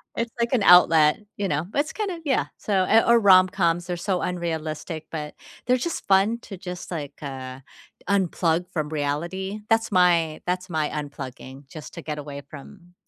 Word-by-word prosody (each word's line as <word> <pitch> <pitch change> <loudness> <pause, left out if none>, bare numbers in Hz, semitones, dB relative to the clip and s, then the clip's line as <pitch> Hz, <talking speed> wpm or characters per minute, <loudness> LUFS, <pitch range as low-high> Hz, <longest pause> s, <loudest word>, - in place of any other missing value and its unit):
It's 230 0 -2
like 235 +2 0
an 220 -5 +2
outlet, 165 -3 +6 0.2
you 200 -1 -1
know? 155 +2 -1
It's 290 +2 0
kinda 390 -6 -3
Yeah, 265 - +1
so 190 -3 0
Eh, 225 +4 +5
or 235 0 +5
rom-coms, 185 -3 +4
they're 175 -1 -3
so 180 +1 -1
unrealistic, 160 -2 -4
but, 150 -2 -5 0.3
they're 250 +1 +3
just 335 +6 -4
fun, 200 +4 +3
to 195 - -9
just, 180 -1 -8
like, 150 -4 -6
uh, 130 -2 -7 0.5
unplug 180 -3 +1
from 155 -4 -2
reality. 170 +7 -3
That's 225 -1 +2
my 170 -4 +3
that's 180 +1 -2
my 155 -2 -1
unplugging, 135 -2 -7
just 155 +1 -10
to 170 - -7
get 150 -1 -5
away 145 -1 -7
from 175 +5 -13
175 Hz, 170 wpm, -24 LUFS, 155-195 Hz, 0.5 s, outlet